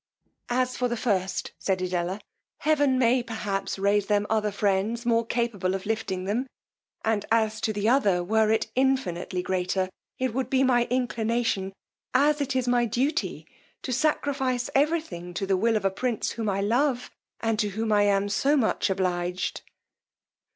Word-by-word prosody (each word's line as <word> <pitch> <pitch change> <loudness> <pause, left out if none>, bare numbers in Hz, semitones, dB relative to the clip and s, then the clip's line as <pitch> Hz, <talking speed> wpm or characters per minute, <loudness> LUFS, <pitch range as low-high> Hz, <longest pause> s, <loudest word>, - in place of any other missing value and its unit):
As 255 +1 0
for 250 - 0
the 240 0 -2
first, 195 -5 -1
said 190 -1 0
Edella, 180 +1 -2 0.4
heaven 290 -4 +3
may 250 0 +3
perhaps 200 -5 -3
raise 200 +1 +2
the 205 -1 +3
mother 210 0 0
friends 205 +4 0
more 230 -1 +3
capable 225 -6 -1
of 190 - -5
lifting 200 -4 -2
them; 230 +7 -1 0.6
and 220 -2 +1
as 220 -1 +2
to 220 - 0
the 205 0 -1
other, 205 -8 +3
were 220 +3 +2
it 220 0 +1
infinitely 205 -9 0
greater, 185 0 -1 0.3
it 255 -3 -1
would 260 +1 -2
be 265 0 +3
my 245 -2 +3
inclination, 230 -5 0 0.4
as 295 +3 +4
it 275 -1 -1
is 255 -1 0
my 245 -1 +3
duty, 250 +7 -1 0.4
to 255 - -2
sacrifice 265 -2 0
every 305 +4 +3
thing 175 - -9
to 195 - -1
the 195 0 +2
will 225 +4 +2
of 200 - -4
a 195 - +3
prince 235 +3 -2
whom 225 -2 -2
I 195 0 0
love, 250 +4 +1 0.3
and 225 -1 0
to 210 - +1
whom 220 +2 -2
I 205 -1 +4
am 200 0 +2
so 275 +8 +2
much 220 -4 +1
obliged. 180 -1 -1
220 Hz, 170 wpm, -26 LUFS, 195-250 Hz, 0.6 s, as